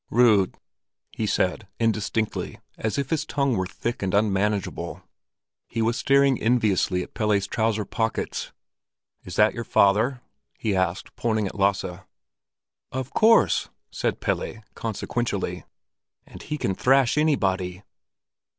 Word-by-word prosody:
"Rud," 110 -6 +4 0.5
he - - -2
said, - - 0
indistinctly, 110 -1 -1 0.2
as 110 +3 -2
if 140 +1 -2
his 155 -2 +1
tongue 140 -5 0
were 95 -2 -1
thick 120 +5 -4
and 95 0 0
unmanageable. 105 -1 0 0.6
He 115 - -2
was 115 +1 +1
staring 140 0 +3
enviously 105 -6 +2
at - - -13
Pelle's 105 -3 +1
trouser 110 0 0
pockets. 110 +1 -2 0.7
"Is 90 - -8
that 105 +1 +4
your 120 - -4
father?" 115 +5 +3 0.4
he 105 -3 -1
asked, 95 -1 -1
pointing 110 -3 0
at 95 - -4
Lasse. 95 -3 0 0.9
"Of 130 0 -4
course!" 225 +1 +4 0.2
said - - -2
Pelle, 110 - -2
consequentially. 115 -1 -3 0.6
"And - - -12
he 150 - -4
can 95 - -1
thrash 130 +4 +3
everybody." 95 - +1
110 Hz, 125 wpm, -25 LUFS, 100-125 Hz, 0.9 s, Rud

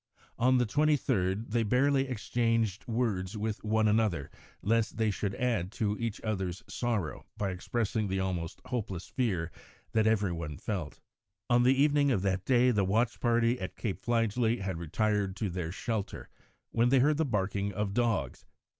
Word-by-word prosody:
On 130 +2 +4
the 125 - +3
23rd 115 -8 +1
they 120 +1 +2
barely 135 +5 +2
exchanged 115 -3 0
words 110 -4 -1
with 105 0 -3
one 110 0 +2
another, 105 -9 +1 0.3
lest 115 +1 +1
they 110 -2 +2
should 100 0 -3
add 115 -7 0
to 105 -2 0
each 115 -3 -2
other's 95 -4 -3
sorrow 110 -9 -2
by 100 -2 -1
expressing 110 +3 -1
the 95 0 -1
almost 90 -3 -3
hopeless 100 -8 -3
fear 95 -10 -1 0.4
that 110 -1 +3
every 105 -4 +2
one 80 -4 -5
felt. 90 -9 -4 0.5
On 120 0 +5
the 130 +2 +4
evening 145 0 +4
of 100 -8 +1
that 95 -1 0
day 125 -1 +4
the 105 -4 +2
watch 110 +5 +1
party 120 0 +2
at 95 - -5
Cape 95 -5 -3
Fligely 115 -1 +1
had 95 -3 -3
retired 100 +3 0
to 100 -2 -2
their 85 -2 -3
shelter 110 +1 -4 0.4
when 120 +1 +3
they 135 - +5
heard 145 +3 +4
the 160 - +2
barking 100 -5 -1
of 100 0 -2
dogs. 110 - -1
110 Hz, 165 wpm, -30 LUFS, 95-120 Hz, 0.5 s, On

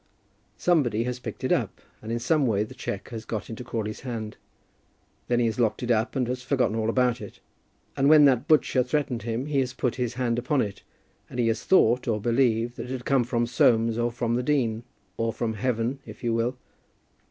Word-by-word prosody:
Somebody 130 -11 +2
has 125 +1 -3
picked - - -7
it - - 0
up, - - 0 0.2
and 110 - -6
in 115 - 0
some 135 +4 +2
way 105 -2 +1
the 110 - -9
cheque 100 - -5
has 115 -2 -6
got 110 -1 -5
into 115 +2 -6
Crawley's 110 -3 -4
hand. 115 -4 -5 0.9
Then 120 -1 +2
he 120 - +2
has 115 0 -1
locked 110 -1 +1
it 120 - 0
up 115 +3 +1
and 130 -3 0
has 125 +1 -3
forgotten 125 -3 0
all 110 0 0
about 125 -1 +1
it; 105 - -10 0.6
and 135 +1 +3
when 150 -1 +8
that 135 0 +3
butcher 150 -4 +4
threatened 130 -2 -1
him, 115 +3 -3
he 145 -2 0
has 130 -1 -1
put 125 -2 -1
his 125 -2 -2
hand 120 -2 0
upon 130 +4 0
it, 100 -5 -2 0.5
and - - -8
he 115 -1 +3
has 115 0 -1
thought, 125 -10 +4
or 110 -2 +1
believed, 120 +1 +1
that - - -5
it - - -7
had 125 -2 -6
come 135 -3 +3
from 120 0 0
Soames 115 -1 +3
or 120 0 +1
from 120 0 -2
the 120 - +1
dean, 125 -5 0 0.4
or 115 0 0
from 115 0 -2
heaven, 120 +3 -1
if - - -12
you 120 -1 +1
will. 120 +3 0
120 Hz, 220 wpm, -26 LUFS, 115-130 Hz, 0.9 s, when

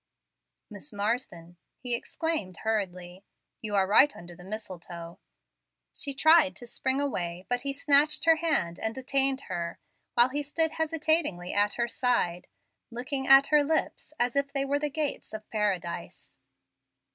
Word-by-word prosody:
"Miss 205 -2 -9
Marsden!" 200 -5 -3 0.2
he 245 -1 -4
exclaimed, 235 - -2
hurriedly, 185 -4 -3 0.4
"you 210 -2 -3
are 195 -1 +3
right 245 +9 +5
under 175 0 -11
the 180 - -14
mistletoe." 175 -4 -8 0.7
She 280 -1 -4
tried 315 +1 +5
to 245 - -10
spring 260 +3 -1
away, 180 -10 -3
but 245 0 -1
he 280 +1 -2
snatched 285 +2 +3
her 325 -1 +6
hand 250 - 0
and 220 0 -2
detained 270 +1 +1
her, 170 -8 -5 0.4
while 240 +1 +6
he 290 +3 -2
stood 315 +2 +1
hesitatingly 315 - 0
at 205 0 +2
her 235 0 0
side, 225 -8 -1 0.4
looking 265 +3 -4
at 270 +1 +7
her 300 -1 +6
lips 315 +1 -1
as 245 +1 0
if 280 0 0
they 275 -1 0
were 285 +1 0
the 295 0 -1
gates 290 -6 -3
of 215 0 -9
Paradise. 195 -5 -3
245 Hz, 150 wpm, -28 LUFS, 190-285 Hz, 0.7 s, at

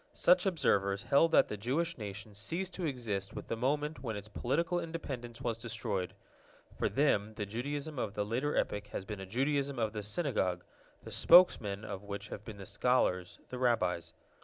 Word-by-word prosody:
Such 180 +2 +5
observers 100 - +2
held 145 +4 +4
that - - +6
the 105 - -5
Jewish 155 +11 0
nation 105 -1 -7
ceased 170 - -2
to 180 -3 -2
exist 110 -8 -3
with - - -6
the - - 0
moment 145 +3 -1
when 115 -4 -3
its 100 0 -6
political 170 - 0
independence 130 -8 -6
was 115 -2 -1
destroyed. 110 -5 -2 0.6
For - - 0
them 110 -7 +1
the 105 - -3
Judaism 140 +7 -4
of 105 -3 -3
the 105 - 0
later 125 +7 -1
epoch 105 0 -1
has 100 - -5
been 105 0 -6
a 95 - -7
Judaism 140 +5 0
of 110 -2 0
the 105 - -3
Synagogue, 105 - 0 0.4
the - - -9
spokesmen 110 - +5
of 100 -3 -5
which 100 +1 -6
have 100 - -7
been 110 -2 -9
the 100 - -8
scholars, 90 -7 +1
the 125 - -5
Rabbis. 90 -9 +1
115 Hz, 185 wpm, -33 LUFS, 100-140 Hz, 0.6 s, that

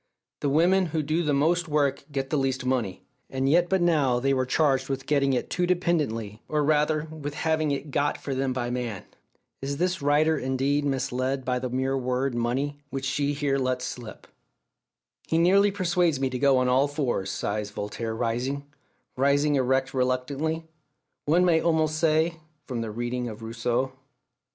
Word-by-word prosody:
The 145 - 0
women 175 +6 +3
who 160 -1 -1
do 155 +4 0
the 150 -3 0
most 165 +5 +2
work 145 -2 0
get 135 -1 -3
the - - +2
least 130 -1 -1
money." 120 -8 -1 0.3
And 135 0 -1
yet 175 +4 +3
but 190 -2 +2
now 145 -8 +3
they 135 +2 +1
were 130 -1 0
charged 135 -2 +2
with 135 0 -3
"getting 140 -2 +2
it" 125 - -2
too 180 -1 +1
dependently, 145 - 0
or 150 -1 0
rather, 150 +1 +2
with 150 -2 -6
having 160 -1 0
it 140 +1 -3
"got" 145 +2 +1
for 140 - -4
them 135 0 0
by 120 -1 -2
man! 120 -6 -3 0.6
Is 140 +1 -3
this 180 +1 0
writer 150 +3 +3
indeed 135 +3 0
misled 130 -1 -1
by 125 -1 0
that 125 -1 -4
mere 130 +1 0
word 130 0 -1
"money," 130 +5 -1
which 135 -2 -4
she 145 +1 0
here 140 -1 0
lets 130 -1 -1
slip? 120 -3 -8 1.0
"He 160 - +1
nearly 195 +4 +5
persuades 175 -6 +1
me 135 -1 0
to 125 - -3
go 140 -1 +4
on 130 0 +2
all 130 +3 +3
fours," 135 -9 -2
sighs 105 +1 -2
Voltaire 110 +2 -4
rising 125 +5 -2 0.5
rising 140 +2 +2
erect 130 -1 +1
reluctantly, 135 +5 -1 0.6
one 170 +5 +4
may 165 -2 +4
almost 155 -2 +1
say 160 +1 +2 0.3
from 125 -3 -3
the 115 - -3
reading 120 +3 -3
of 110 +1 -9
Rousseau. 120 +3 -1
135 Hz, 175 wpm, -26 LUFS, 125-155 Hz, 1.0 s, nearly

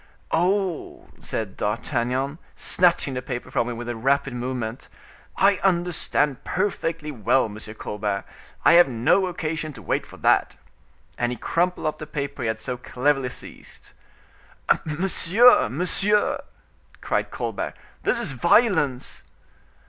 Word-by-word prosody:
"Oh!" 185 0 -1
said 105 -4 -4
D'Artagnan, 125 +6 -1 0.2
snatching 175 -6 +2
the 125 - -3
paper 125 -1 -6
from 120 - 0
him 120 - -5
with 120 0 -6
a 120 - -3
rapid 135 +3 +1
movement; 125 -1 -4 0.5
"I 195 0 +4
understand 170 -7 0
perfectly 165 -5 -2
well, 130 +1 +2
M. 105 -1 -7 0.2
Colbert; 105 -2 -3 0.4
I - - +7
have 175 -1 +8
no 130 +10 +2
occasion 160 -3 -3
to 115 - -11
wait - - -1
for - - -13
that." - - +2 0.6
And 120 0 +1
he - - -3
crumpled 175 +9 0
up 155 - -1
the 155 - -7
paper 140 -2 -4
he 120 - -1
had 110 0 -1
so 125 +2 -4
cleverly 130 +1 0
seized. - - -11 0.9
"Monsieur, 180 - +4
monsieur!" 190 - +2 0.6
cried - - -1
Colbert, - - -4 0.3
"this - - +1
is 235 - 0
violence!" 150 - +2
140 Hz, 135 wpm, -24 LUFS, 120-175 Hz, 0.9 s, have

